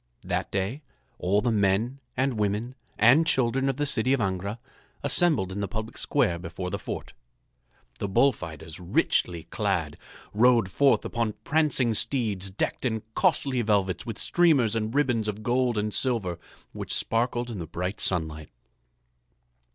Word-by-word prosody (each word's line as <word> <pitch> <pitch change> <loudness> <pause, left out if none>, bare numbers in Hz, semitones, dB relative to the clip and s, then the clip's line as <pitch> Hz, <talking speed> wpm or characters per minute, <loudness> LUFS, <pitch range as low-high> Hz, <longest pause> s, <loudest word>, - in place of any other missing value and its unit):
That - - -2
day 100 +9 -2 0.4
all 100 +3 +2
the 120 - +1
men 105 +5 +1 0.2
and 130 +1 +1
women 105 +4 -1 0.2
and 120 +9 +6
children 130 -1 +2
of 135 - -2
the 145 - 0
city 130 -2 +1
of 135 - +1
Angra 100 +1 -2 0.5
assembled 145 - +2
in 95 - -4
the 100 - -1
public 110 0 -5
square 85 0 0
before 90 +2 -6
the - - -3
fort. - - -6 0.9
The - - -2
bullfighters, 85 - 0
richly 85 -1 0
clad, 90 -8 -1 0.4
rode 115 -3 +4
forth 140 +5 +3
upon 115 -3 -1
prancing 150 -7 +2
steeds 105 -6 +1
decked 95 - -2
in 110 -4 -1
costly 130 +1 +2
velvets 100 -5 +1
with 115 -3 -6
streamers 145 -11 +3
and 110 -1 -1
ribbons 125 -5 +1
of 105 0 -4
gold 125 -1 +1
and 105 0 -1
silver 110 -10 0 0.3
which - - -5
sparkled 120 +1 0
in 105 - -5
the 85 - -5
bright 90 +5 -3
sunlight. 80 -4 0
110 Hz, 150 wpm, -26 LUFS, 95-125 Hz, 0.9 s, and